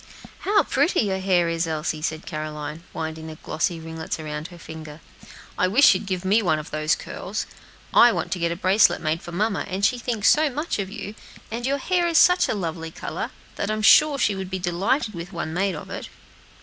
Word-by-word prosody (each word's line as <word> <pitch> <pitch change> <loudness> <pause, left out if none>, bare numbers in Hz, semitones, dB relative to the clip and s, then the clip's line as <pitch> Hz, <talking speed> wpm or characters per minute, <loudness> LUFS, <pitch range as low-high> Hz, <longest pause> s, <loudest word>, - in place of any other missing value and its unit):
"How 410 +1 +3
pretty 295 +7 +2
your 195 -3 -1
hair 185 -3 +2
is, 165 0 -1
Elsie," 155 0 -2
said 155 +1 -3
Caroline, 155 0 -5
winding 160 0 -5
the 160 - -7
glossy 160 +2 -2
ringlets 160 0 -5
around 150 0 -5
her 175 - -13
finger. 160 -2 -9 0.6
"I 185 - +4
wish 230 +7 +6
you'd 195 +2 -4
give 185 -1 -3
me 205 +4 +4
one 160 -6 +2
of 155 - -7
these 155 0 +1
curls. 200 +4 -5 0.5
I 240 - +7
want - - -3
to 180 - -1
get 170 0 0
a - - -1
bracelet 190 +3 +4
made 160 +1 -1
for 175 - -9
mamma, 200 +3 0
and 195 +2 0
she 250 - +2
thinks 230 -3 -1
so 305 0 +3
much 295 -1 -3
of 195 -1 -2
you, 205 0 -7 0.4
and 240 +2 -3
your 280 +1 +1
hair 350 +4 +1
is 335 -1 +2
such 360 +1 +5
a - - 0
lovely 165 -4 -4
color, - - -5 0.3
that 200 - -2
I 215 - 0
am 215 - -4
sure 300 +7 +6
she 210 - +2
would 190 -1 -5
be 190 - -2
delighted 195 - 0
with 170 +1 -7
one 160 -2 -4
made 190 +1 0
of 150 - -9
it." - - -6
185 Hz, 220 wpm, -24 LUFS, 160-215 Hz, 0.6 s, I